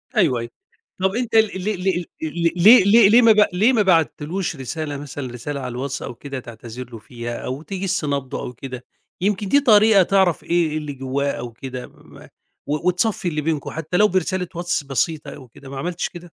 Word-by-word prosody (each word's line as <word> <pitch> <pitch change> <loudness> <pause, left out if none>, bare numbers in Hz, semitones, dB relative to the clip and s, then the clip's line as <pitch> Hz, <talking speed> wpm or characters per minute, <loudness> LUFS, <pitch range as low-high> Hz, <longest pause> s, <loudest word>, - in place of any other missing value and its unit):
أيوه، 150 - +3
أيوه. 120 - -6 0.5
طب 190 +2 +1
أنت 240 -2 -2
ل 225 - +8 0.2
ل 195 +3 -2
ل 190 - +2
ل 175 -1 -1 0.2
ل 165 +2 0
ليه 205 +6 +8
ليه 205 +1 +6
ليه 235 +3 +7
ما 230 -2 +7
ب 210 -1 +6
ليه 220 +8 +3
ما 220 - +3
بعتّلوش 170 -1 0
رسالة 145 +2 -5
مثلًا 140 -3 -7
رسالة 140 +4 -5
على 130 - -4
الواتس 135 +3 -4
أو 120 - -6
كده 140 0 -7
تعتذر 120 0 -9
له 115 - -8
فيها 120 0 -7
أو 130 +3 -4
تِجِس 190 -1 -3
نبضه 140 -3 -3
أو 125 - -6
كده؟ 125 0 -8 0.4
يمكن 200 +1 0
دي 285 +9 +4
طريقة 215 -6 +6
تعرف 190 -3 +2
إيه 170 -1 +1
إيه 155 - -2
اللي 150 -2 -5
جوّاه 135 +1 -2
أو 120 - -6
كده 125 +1 -7
م - - -20
ما - - -14 0.4
و 150 +4 -2
وتصفّي 185 +1 0
اللي 155 -3 -1
بينكم 150 -2 -2
حتّى 160 +2 -3
لو 210 - +6
برسالة 185 -1 -1
واتس 175 -2 -1
بسيطة 145 +3 -2
أو 130 - -13
كده 135 +3 -14
ما 135 - -7
عملتش 175 +5 -3
كده؟ 175 0 -11
160 Hz, 215 wpm, -21 LUFS, 135-190 Hz, 0.5 s, ل